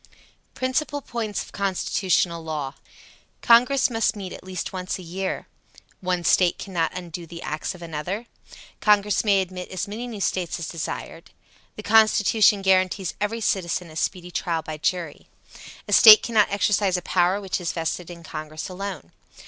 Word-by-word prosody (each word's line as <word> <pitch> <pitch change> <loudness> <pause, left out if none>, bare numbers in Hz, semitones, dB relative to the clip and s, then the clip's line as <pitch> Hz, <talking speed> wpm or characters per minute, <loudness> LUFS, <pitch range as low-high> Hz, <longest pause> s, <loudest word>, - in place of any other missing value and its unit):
PRINCIPAL 280 +2 -1
POINTS 225 -3 -3
OF - - -15
CONSTITUTIONAL 185 -3 0
LAW. 150 -4 -4 0.7
Congress 250 +4 +5
must 225 -2 +1
meet 195 -3 -7
at - - -10
least 185 -1 -5
once 185 -1 -3
a 185 - -10
year. 185 +3 -4 0.5
One 180 -1 -1
State 175 +1 +3
cannot 180 -2 -2
undo 175 -1 -7
the 170 +1 -9
acts 155 +4 -4
of 175 - -11
another. 170 +7 -4 0.5
Congress 210 -1 +3
may 200 -3 +3
admit 180 0 -8
as 185 +2 -4
many 225 +4 -5
new 225 -4 -7
States 185 -3 -1
as 170 - -5
desired. 165 -2 -6 0.5
The 215 - -8
Constitution 215 -1 +4
guarantees 185 0 +2
every 225 +2 -1
citizen 180 -4 -1
a - - -13
speedy 180 +2 -3
trial 165 -2 -2
by 155 -1 -6
jury. 170 -1 -3 0.6
A - - -2
State 215 -1 +10
cannot 220 -3 +3
exercise 200 -2 +1
a 180 - -6
power 180 +2 +2
which 195 -2 -3
is 170 - -2
vested 165 +1 -3
in 170 -1 -10
Congress 155 +1 -7
alone. 185 - -6
185 Hz, 160 wpm, -24 LUFS, 170-210 Hz, 0.7 s, State